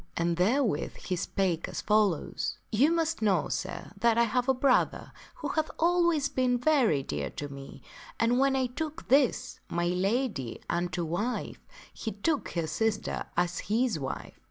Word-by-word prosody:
And 170 0 +1
therewith 210 - +1
he 185 - -3
spake 175 -1 -1
as - - -4
follows: 210 -6 +1
" - - -41
You 265 +9 +4
must 330 -3 0
know, 195 -7 +2
sir, - - -4
that 230 +3 +3
I 235 - +5
have 250 +3 0
a - - +6
brother 255 0 +2 0.2
who - - -4
hath 315 -1 0
always 340 -3 +3
been 255 -2 +1
very 245 - +3
dear 75 - -3
to 145 - -6
me, 140 0 -10 0.4
and 235 +2 +3
when 270 0 +3
I 260 -1 +2
took 310 +5 -5
this, 270 -1 +2
my 175 0 0
lady, 185 - -1
unto 175 0 -1
wife, 200 +10 -2 0.3
he 220 - -5
took 285 +9 -1
her 170 -2 -1
sister 220 +6 -1
as 175 0 +1
his 225 -4 +1
wife. 135 -2 -6
225 Hz, 165 wpm, -29 LUFS, 175-265 Hz, 0.4 s, a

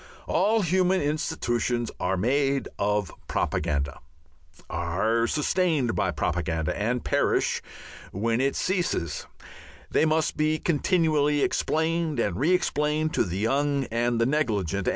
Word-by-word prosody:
All 210 +6 +2
human 185 +2 +2
institutions 120 -6 -1
are 95 +1 0
made 135 +6 +1
of 105 -2 0 0.2
propaganda, 70 -1 -1 0.7
are 100 +8 0
sustained 150 -5 +1
by 95 - +1
propaganda 80 0 -1
and 120 +4 -1
perish - - +1 0.5
when 115 +5 0
it 135 +1 +1
ceases; 175 - -1 0.6
they - - +3
must 155 0 +1
be 155 +1 +2
continually 155 -3 +2
explained 160 -2 0
and 100 -6 0
re 145 - +1
explained 155 -3 +1
to - - +2
the 90 -1 -4
young 140 +6 +1
and 120 0 0
the 115 - +3
negligent. 105 - 0
135 Hz, 120 wpm, -26 LUFS, 105-155 Hz, 0.7 s, they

